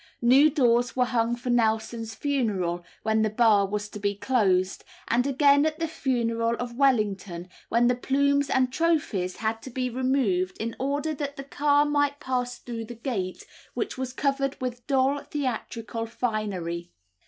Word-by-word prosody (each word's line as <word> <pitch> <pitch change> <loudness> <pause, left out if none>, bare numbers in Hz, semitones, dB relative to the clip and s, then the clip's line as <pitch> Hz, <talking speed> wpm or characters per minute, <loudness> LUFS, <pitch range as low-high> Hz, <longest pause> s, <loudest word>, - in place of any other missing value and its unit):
New 270 +6 +6
doors 245 -5 +2
were 250 -1 +3
hung 235 -1 0
for 245 +1 -3
Nelson's 225 -1 0
funeral, 200 -11 -1 0.2
when 220 0 +2
the 215 - +2
Bar 215 -2 +4
was 210 +1 -3
to 210 - -8
be 200 0 -1
closed; 195 -5 +1 0.2
and 245 +3 +2
again 280 +1 +4
at 310 0 0
the 330 - -1
funeral 235 -6 0
of 245 -1 -5
Wellington, 205 -9 +1 0.2
when 235 +1 +3
the 245 - +4
plumes 280 +3 +1
and 255 -1 +2
trophies 280 - 0
had 225 0 -2
to 260 - -8
be 255 0 -2
removed 240 -8 0
in 230 +1 -3
order 285 +3 -1
that 285 -1 -4
the 275 - -5
car 290 +1 +2
might 290 -1 +1
pass 245 -1 -2
through 230 -2 -6
the 240 +2 -9
gate, 220 -7 -4 0.3
which 415 - -2
was 260 -1 -4
covered 275 +1 -1
with 250 -2 -5
dull 270 +1 +2
theatrical 230 -4 -4
finery. 200 -8 -3
245 Hz, 165 wpm, -26 LUFS, 220-275 Hz, 0.3 s, New